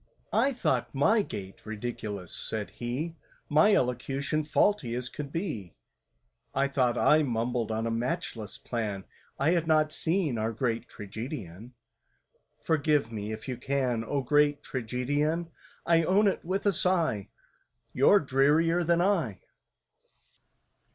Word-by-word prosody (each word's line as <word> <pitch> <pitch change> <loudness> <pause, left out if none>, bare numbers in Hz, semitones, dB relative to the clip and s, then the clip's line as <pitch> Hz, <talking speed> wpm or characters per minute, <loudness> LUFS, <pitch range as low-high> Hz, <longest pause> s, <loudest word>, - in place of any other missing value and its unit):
"I 280 - +3
thought 140 - -1
my 215 +11 +4
gait 95 - -7
ridiculous," 105 -4 -5
said 110 -2 -4
he— 135 +8 -4 0.3
"My 160 +8 +5
elocution 135 +4 0
faulty 150 - +1
as 125 0 -3
could 140 -2 -7
be; 145 - -4 0.8
I 135 +1 +3
thought 125 -3 +1
I 155 +1 +5
mumbled 120 -3 -1
on 110 +1 -1
a 115 - -1
matchless 115 -2 -3
plan— 105 -5 -3 0.3
I 140 +4 +2
had 170 -2 +1
not 155 -1 +3
seen 160 - 0
our 110 +1 -1
great 115 0 -2
Tragedian! 110 - -7 0.8
"Forgive 150 -6 +1
me, 105 -1 -4
if 110 +3 -7
you 125 -2 -3
can, 125 -3 0
O 140 +4 -1
great 145 +2 +3
Tragedian! 145 +7 -1 0.3
I 165 -1 +4
own 195 +5 +3
it 195 - 0
with 190 +4 -2
a 200 - +4
sigh— 165 - 0 0.6
You're 140 +10 +6
drearier 150 +5 +3
than 170 +1 +2
I!" 165 - 0
135 Hz, 130 wpm, -29 LUFS, 115-160 Hz, 0.8 s, You're